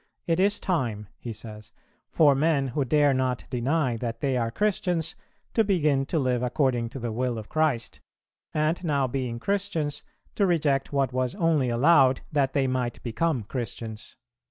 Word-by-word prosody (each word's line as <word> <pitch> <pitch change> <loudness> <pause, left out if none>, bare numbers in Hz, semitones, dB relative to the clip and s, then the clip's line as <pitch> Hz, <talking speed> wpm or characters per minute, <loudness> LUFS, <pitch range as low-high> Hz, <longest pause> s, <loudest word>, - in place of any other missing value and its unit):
"It 165 0 +1
is 200 +2 +2
time," 115 - -2
he 120 - -6
says, 105 -1 -9 0.4
"for 150 -3 +5
men 140 -1 +1
who 140 +3 0
dare 145 +2 +3
not 130 -1 0
deny 130 0 0
that 115 0 -4
they 135 -2 0
are 115 -2 0
Christians, 175 - -1 0.4
to 225 - +4
begin 150 -9 +1
to 165 - -1
live 130 -4 +1
according 125 -2 0
to 135 - -7
the 120 -1 -3
will 120 +1 -1
of 110 -1 -8
Christ, 155 -7 0 0.5
and, 155 +4 0
now 145 -5 +1
being 125 -2 -3
Christians, 165 -3 -2 0.3
to 200 - +2
reject 145 -6 +1
what 135 -3 0
was 130 -1 -1
only 165 -8 +2
allowed 130 +1 +4
that 140 -3 +1
they 140 -2 +2
might 130 -2 -2
become 130 +2 -1
Christians." 115 -1 -6
135 Hz, 165 wpm, -26 LUFS, 120-155 Hz, 0.5 s, for